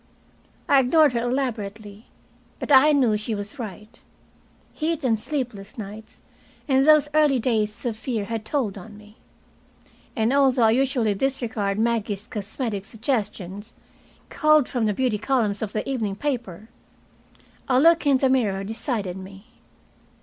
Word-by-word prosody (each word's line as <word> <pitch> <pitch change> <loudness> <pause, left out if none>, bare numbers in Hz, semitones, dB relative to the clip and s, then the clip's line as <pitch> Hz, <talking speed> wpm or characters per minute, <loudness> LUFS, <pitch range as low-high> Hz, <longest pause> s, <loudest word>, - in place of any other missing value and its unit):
I 275 - +5
ignored 290 +2 +4
her 235 - 0
elaborately, 220 -4 -4 0.5
but - - -5
I 280 +3 +7
knew 250 -7 +3
she 215 +1 -4
was 205 +6 -7
right. 215 +1 -8 0.7
Heat 320 -1 -2
and 225 -4 +1
sleepless 225 -6 -5
nights 215 +1 -10 0.4
and 265 -1 +3
those 305 0 +5
early 300 -3 +4
days 220 -1 0
of 235 -3 -1
fear 220 -2 -3
had 225 +1 -4
told 220 -6 -2
on 210 +2 -12
me. 210 +1 -17 1.0
And 225 +1 +1
although 265 -3 +3
I 220 - +5
usually 250 -3 +1
disregard 225 -4 -2
Maggie's 220 -3 -1
cosmetic 210 -1 -4
suggestions, 210 -3 -4 0.6
culled 305 -3 +3
from 245 -4 -1
the 210 - +1
beauty 245 -4 0
columns 220 -5 0
of 215 -2 -3
the 215 - -3
evening 225 -7 -2
paper, 230 -6 -4 1.0
a 255 -1 +3
look 330 +1 +4
in 275 -2 +5
the 265 - +2
mirror 205 -7 +1
decided 210 -3 -4
me. 195 +2 -11
230 Hz, 140 wpm, -24 LUFS, 210-265 Hz, 1.0 s, I